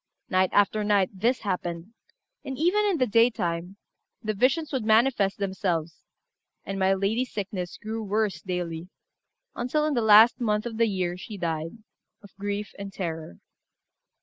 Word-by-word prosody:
Night 185 0 +3
after 205 +1 +3
night 205 -3 +2
this 230 +7 0
happened, 180 0 -4 0.5
and 265 - -5
even 365 +7 +2
in 395 -4 +1
the 255 - +3
daytime 200 -6 +1 0.5
the 215 0 -1
visions 275 +8 +1
would 260 -4 -1
manifest 220 -2 +3
themselves; 180 -5 -2 0.6
and 195 0 -4
my 190 0 +3
lady's 220 +6 -1
sickness 190 -3 -4
grew 220 +1 -5
worse 210 -1 -1
daily, 175 -2 -4 0.7
until 275 +5 0
in 305 - 0
the 240 - +1
last 220 +3 +7
month 210 -2 0
of 230 -2 -5
the 230 0 +3
year 180 -3 -2
she 205 +3 -8
died, 165 +2 -3 0.5
of 200 - -16
grief 205 +1 -3
and 200 0 -6
terror. 160 - -5
205 Hz, 150 wpm, -26 LUFS, 185-230 Hz, 0.7 s, last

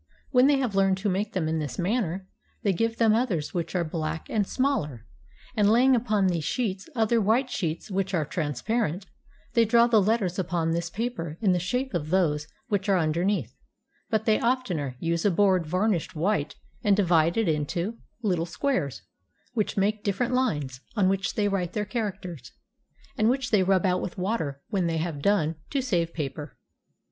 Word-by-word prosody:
When 255 0 +6
they 285 -1 +4
have 255 -6 -1
learned 195 -1 +3
to 205 +2 -1
make 200 +3 -1
them 175 -4 0
in 160 0 0
this 145 -4 -4
manner, 190 -2 -1 0.4
they 200 - +2
give 230 +4 0
them 225 -2 +4
others 190 - 0
which 175 +1 -3
are 175 - +2
black 160 0 -4
and 205 -3 +1
smaller; 155 - -1 0.5
and 205 -2 +4
laying 255 +3 +5
upon 215 -4 +1
these 175 -4 +1
sheets 200 - -2
other 225 0 +2
white 235 +6 +2
sheets 170 +1 -3
which 195 0 -1
are 160 -3 +1
transparent, 175 - -2 0.5
they 230 - +5
draw 235 +1 +5
the 230 -3 +4
letters 195 -3 +1
upon 170 -3 0
this 170 0 -1
paper 185 -7 -4
in 200 -4 +3
the 180 - +2
shape 250 +9 -2
of 155 -3 -2
those 155 -5 +1 0.2
which 205 -3 -1
are 195 - +4
underneath; 165 - 0 0.6
but 220 -1 0
they 215 -1 +3
oftener 185 - -1
use 170 0 -1
a 205 - +4
board 185 -2 +3
varnished 185 0 0
white 160 -2 0 0.3
and 205 -3 +4
divided 175 +2 +3
into 170 +8 -1 0.2
little 175 -5 0
squares, 165 - -1 0.5
which 215 -4 -1
make 205 +2 +1
different 240 +5 0
lines, 150 - -1
on 195 -4 +3
which 195 0 -1
they 205 -1 +2
write 185 -3 -1
their 210 -1 -1
characters, 185 - -5 0.7
and 215 +1 +4
which 260 0 0
they 210 -3 +5
rub 185 0 +2
out 180 -1 +2
with 180 - -5
water 180 -8 -2
when 190 -5 0
they 165 -1 -1
have 160 -3 -3
done, 165 -4 +2
to 280 - 0
save 175 -10 0
paper. 150 -1 -5
190 Hz, 180 wpm, -26 LUFS, 165-220 Hz, 0.7 s, When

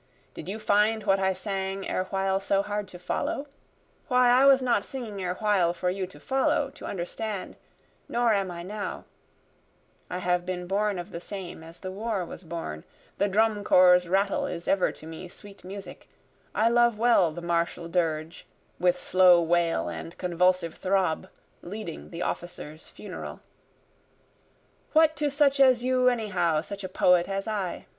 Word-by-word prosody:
Did 165 - -8
you 205 - -3
find 215 +1 +2
what 195 -1 +3
I 190 0 +2
sang 195 0 -3
erewhile 190 +1 0
so 195 0 +1
hard 205 0 -3
to 180 - -11
follow? 180 +9 -2 0.6
Why 250 -3 +4
I 255 +3 +6
was 275 -1 +7
not 245 -6 +1
singing 225 -7 -6
erewhile 185 -1 +1
for 180 +1 -1
you 190 0 -3
to 190 - -15
follow, 275 +1 +1
to - - -9
understand 200 +2 -4 0.5
nor 235 -1 +2
am 195 -2 0
I 170 -1 -6
now; 205 +3 -5 1.1
(I 180 - -3
have 180 -1 0
been 180 0 -4
born 200 +2 0
of 175 0 -7
the 170 - -5
same 180 -2 -7
as 165 +1 -12
the 185 - -6
war 205 -1 -2
was 175 - -10
born, 160 - -6 0.4
The 200 - +3
drum 210 +1 +2
corps' 180 -2 +6
rattle 195 +2 +1
is 170 0 -6
ever 195 -2 +2
to - - -13
me 160 +3 -8
sweet 200 +3 -12
music, 195 +2 -9 0.5
I 220 - +3
love 235 -1 +3
well 220 -7 +4
the 170 +2 -8
martial 170 0 -1
dirge, 165 -2 -2 0.3
With 180 0 +2
slow 180 -1 +5
wail 170 - +1
and 165 - -7
convulsive 180 -1 +1
throb 185 -4 0 0.3
leading 185 -3 -7
the 170 +1 -5
officer's 160 -3 -6
funeral;) - - -8 1.5
What 315 0 +5
to 295 -1 +1
such 280 -1 +2
as 255 -3 +5
you 255 0 +3
anyhow 185 -9 0
such 200 +5 -8
a 185 - -4
poet 180 -1 +3
as 195 +1 -3
I? 200 -5 -3
190 Hz, 165 wpm, -27 LUFS, 175-215 Hz, 1.5 s, was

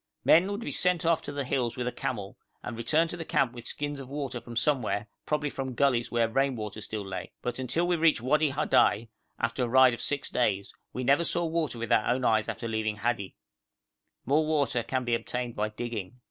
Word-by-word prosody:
Men 175 +5 +6
would 205 +2 -3
be - - -4
sent 180 -2 +2
off 165 0 +3
to - - -5
the 140 -1 -2
hills 125 -2 -1
with 125 - -2
a - - 0
camel, 105 -5 -4 0.3
and 120 - -5
return 155 +8 +2
to 175 - -4
the 165 - -4
camp 130 -5 +1
with 120 -1 -7
skins 145 -1 -3
of 130 -2 -9
water 135 -4 -4
from 120 0 -10
somewhere, 115 -5 +1 0.2
probably 150 -1 0
from 130 -2 -4
gulleys 125 -4 +2
where 115 -1 +2
rain 135 +3 +1
water 105 -1 -6
still 105 0 -4
lay; 95 -2 -6
but 125 +1 -3
until 130 +7 0
we 175 - +2
reached 165 -4 +4
Wadi 150 +5 +2
Hadai, 115 -5 +2 0.3
after 115 +2 -1
a - - 0
ride 130 0 +6
of 115 - -5
six 145 -1 -2
days, 100 -5 0 0.2
we 130 - -4
never 140 +6 +4
saw 170 +1 +1
water 160 -5 -1
with 115 -1 -4
our 110 - +4
own 125 +1 +1
eyes 110 -1 +2
after 115 - -4
leaving 110 -1 -1
Hadi. 105 -2 -2 0.9
More 145 +5 +3
water 145 -6 +1
can 130 +2 -2
be 120 - 0
obtained 120 0 -2
by 105 +1 -1
digging. 110 -1 -5
125 Hz, 220 wpm, -28 LUFS, 115-145 Hz, 0.9 s, Men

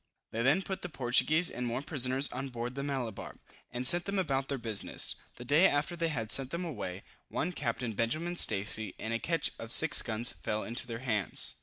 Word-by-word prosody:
They 115 - -3
then 145 +10 +2
put 190 0 -5
the 180 - -5
Portuguese 150 +5 +3
and 125 0 -4
Moor 120 +3 -3
prisoners 135 -2 +1
on 130 +2 -5
board 120 0 -5
the 140 - -5
Malabar, 130 -7 -5 0.4
and 125 +1 -4
sent 175 +6 +7
them 200 0 -2
about 135 -7 -1
their 140 - -3
business. 110 -4 +1 0.2
The 120 - -10
day 150 +9 +5
after 145 +3 -1
they 170 -1 -1
had 115 -8 -3
sent 135 -1 +2
them 170 +4 -4
away, 100 - -6 0.3
one 180 - -2
Captain 120 -6 -3
Benjamin 155 - -2
Stacy, 105 - +1
in 110 - -5
a 115 - -1
ketch 165 +4 -1
of 115 0 -5
6 160 +5 +6
guns 115 +1 +2
fell 110 0 -4
into 120 +2 +2
their 115 +2 -7
hands. 105 -6 -1
130 Hz, 205 wpm, -30 LUFS, 115-155 Hz, 0.4 s, sent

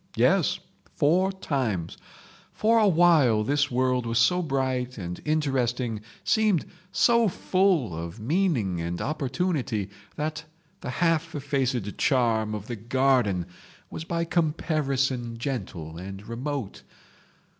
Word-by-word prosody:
Yes—four 180 +6 +1
times. 125 - -2 0.6
For 225 +1 +3
a 215 - +5
while 160 - +5
this 145 +5 +1
world 125 -1 +1
was 115 0 0
so 180 +9 +4
bright 130 -4 -1
and 90 -3 -6
interesting, 130 -7 0 0.2
seemed 215 -7 +2 0.3
so 235 -1 +4
full 185 - +1
of 85 +5 -6
meaning 120 - 0
and 85 +1 -3
opportunity 135 - -2 0.2
that 155 +1 -3 0.4
the - - -6
half 165 +3 0
effaced 130 -7 -1
charm 115 -6 +2
of 105 -1 -6
the 120 - -5
garden 120 -5 +1 0.5
was - - -5
by 170 0 -2
comparison 140 -7 0
gentle 95 - -5
and 95 +2 -8
remote. 125 -1 -4
130 Hz, 115 wpm, -26 LUFS, 110-160 Hz, 0.6 s, a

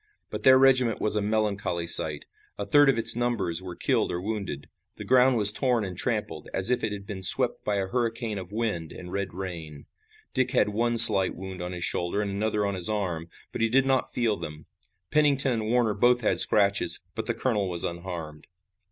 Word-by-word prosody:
But - - -7
their 130 0 +4
regiment 130 -4 +1
was 110 - -2
a 105 - -2
melancholy 100 -5 -4
sight. 80 -3 +4 0.3
A 100 - -6
third 145 +3 +3
of 135 - 0
its 115 - +6
numbers 115 -8 -2
were 90 -2 -10
killed - - -2
or 85 - -5
wounded. 100 -7 -7 0.3
The - - -9
ground 130 0 +1
was 105 -2 +8
torn 120 -2 -2
and 95 -2 -9
trampled, - - -6
as 95 +5 +3
if 125 - -2
it 110 - -3
had 100 -1 -9
been 100 -2 -9
swept 95 - +5
by 105 - -3
a 100 -1 -3
hurricane 115 -1 -5
of 95 0 -12
wind 105 -8 -5
and 90 0 -12
red 100 0 -5
rain. 80 -5 -10 0.5
Dick 130 -2 -1
had 120 -5 -1
one 115 +3 -3
slight 105 -5 +9
wound 95 0 -10
on 90 0 -7
his 90 -1 -7
shoulder 85 +4 -4
and 105 -1 -4
another 105 +1 -3
on 100 - -4
his 90 -1 +2
arm, 90 -6 -5 0.2
but - - -7
he 115 - 0
did 135 +3 +1
not 135 -1 -2
feel 115 -4 -2
them. 75 -2 -11 0.5
Pennington 145 -3 +2
and 110 -2 -5
Warner 115 -2 -1
both 120 +4 0
had 110 - -1
scratches, 100 -1 +3
but - - -7
the - - -3
colonel 105 -7 -3
was 85 -1 -2
unharmed. 85 -3 -9
105 Hz, 210 wpm, -24 LUFS, 90-120 Hz, 0.5 s, slight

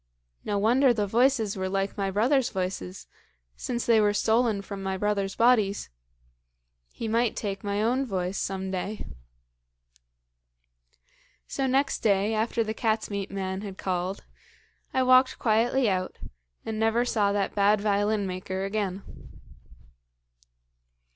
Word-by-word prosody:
No 205 - -1
wonder 240 +5 +4
the 210 -2 0
voices 230 0 +2
were 190 -1 -2
like 195 +1 -1
my 195 -2 -1
brothers' 240 +7 +2
voices, 180 - -4 0.5
since 240 -1 -3
they 225 -2 +5
were 205 0 +2
stolen 220 -2 +2
from 195 0 -7
my 190 0 -2
brothers' 200 -1 -1
bodies. 220 - +2 1.0
He 230 - -5
might 230 +1 +1
take 195 -2 -4
my 205 +1 -1
own 255 +4 +1
voice 185 -2 -2
some 190 0 -3
day. 195 +3 -4 2.4
"So 270 - -1
next 270 +2 +1
day, 205 0 +2
after 225 +1 0
the 220 0 -3
cat's 220 -1 -1
meat 200 -1 -3
man 190 -1 -4
had 195 -2 -7
called, 185 +1 -3 0.7
I 260 - +2
walked 255 +1 +5
quietly 235 +3 +2
out, 185 -2 -1 0.5
and 220 -1 -3
never 225 +2 +2
saw 210 -5 +1
that 200 -1 -1
bad 205 +1 +3
violin 205 0 +1
maker 190 +1 -4
again. 195 -2 -2
205 Hz, 135 wpm, -27 LUFS, 195-230 Hz, 2.4 s, they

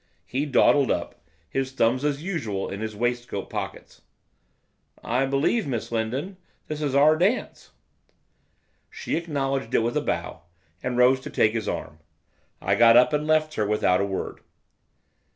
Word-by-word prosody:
He 140 +4 -2
dawdled 140 0 +4
up, - - -3 0.3
his 135 0 -3
thumbs, 130 +1 +1
as 145 0 -1
usual, 115 - -3
in 100 - -5
his 110 -1 -4
waistcoat 120 -2 -3
pockets. - - -6 1.0
'I 130 +3 0
believe, 140 - +1
Miss 120 -4 -3
Lindon, 130 - -3 0.3
this 155 0 -5
is 140 -3 -1
our 150 +3 +6
dance.' 190 +10 -1 1.2
She - - -4
acknowledged 135 -7 -2
it - - +4
with 120 +1 -1
a - - +1
bow, - - -3 0.4
and 125 -1 -3
rose 125 +1 +5
to - - -8
take 110 - +2
his 115 -2 -2
arm. 80 -2 -5 0.6
I - - 0
got 115 0 +6
up, 125 +5 +5
and 150 +1 0
left 155 0 +2
her, 105 - -1
without 100 -3 +2
a - - +1
word. 95 -1 -4
130 Hz, 155 wpm, -25 LUFS, 115-150 Hz, 1.2 s, our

